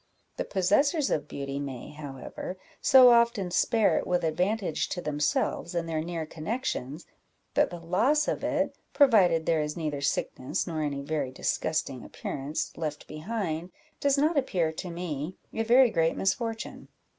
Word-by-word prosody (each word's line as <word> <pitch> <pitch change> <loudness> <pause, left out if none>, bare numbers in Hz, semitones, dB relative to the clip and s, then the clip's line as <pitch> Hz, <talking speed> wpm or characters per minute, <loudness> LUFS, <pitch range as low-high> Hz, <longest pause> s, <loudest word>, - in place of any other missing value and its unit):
The - - -2
possessors 270 - +2
of 150 -1 0
beauty 140 -1 -4
may, 135 -4 -6
however, 145 +4 -7 0.2
so 255 -2 +8
often 235 -6 +3
spare 220 +4 +3
it - - -5
with 180 -1 +1
advantage 180 +2 0
to 180 - -3
themselves 150 +2 -1
and 170 -1 -1
their 160 -1 -1
near 165 -1 -4
connections, 160 - -4 0.5
that - - +3
the 175 - -7
loss 225 - +2
of - - -2
it, 290 -1 0 0.2
provided 185 - +5
there 165 -2 +2
is 150 +1 -3
neither 150 -4 -3
sickness, 130 -2 -1
nor 160 -3 -3
any 140 -2 -2
very 145 -2 -2
disgusting 135 0 -2
appearance, 140 +3 -4
left 150 -2 -4
behind, 170 0 -4 0.3
does 280 0 +2
not 300 +2 +3
appear 175 - 0
to 180 +3 -6
me 170 -1 -4 0.2
a 225 - -1
very 240 +2 +5
great 165 -3 +1
misfortune." 225 +3 -2
170 Hz, 155 wpm, -28 LUFS, 150-225 Hz, 0.5 s, so